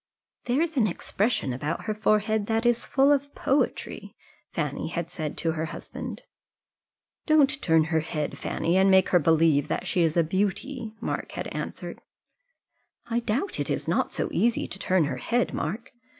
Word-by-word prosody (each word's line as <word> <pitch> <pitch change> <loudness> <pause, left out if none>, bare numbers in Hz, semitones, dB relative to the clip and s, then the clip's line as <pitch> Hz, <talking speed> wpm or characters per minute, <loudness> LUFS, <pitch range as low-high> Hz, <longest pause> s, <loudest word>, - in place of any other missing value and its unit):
"There 255 +6 +2
is 325 -3 -4
an 225 -4 +4
expression 205 - -1
about 145 +6 -3
her 215 - -1
forehead 215 0 +1
that 225 +1 0
is 240 0 +2
full 275 +1 +4
of 285 0 0
poetry," 245 -6 -1 0.4
Fanny 150 -4 -2
had 170 0 -4
said 155 -3 -4
to 165 - 0
her 160 0 -2
husband. 160 - -7 1.0
"Don't 300 -3 +5
you 275 - -7
turn 160 -2 +4
her 160 0 +1
head, 155 -1 -3
Fanny, 170 +3 0
and 190 +1 +5
make 190 -1 +5
her 180 - +5
believe 160 -2 +3
that - - -2
she 180 - +1
is 165 0 +2
a 170 - +5
beauty," 210 - -2
Mark - - -4
had - - -4
answered. - - -6 1.1
"I 235 - +2
doubt 235 - -2
it - - -2
is - - -2
not - - +1
so - - -1
easy 235 +1 +1
to 195 - -7
turn 185 -3 +2
her 150 - -2
head, 245 0 0
Mark. 215 +10 -4
200 Hz, 180 wpm, -26 LUFS, 160-240 Hz, 1.1 s, Don't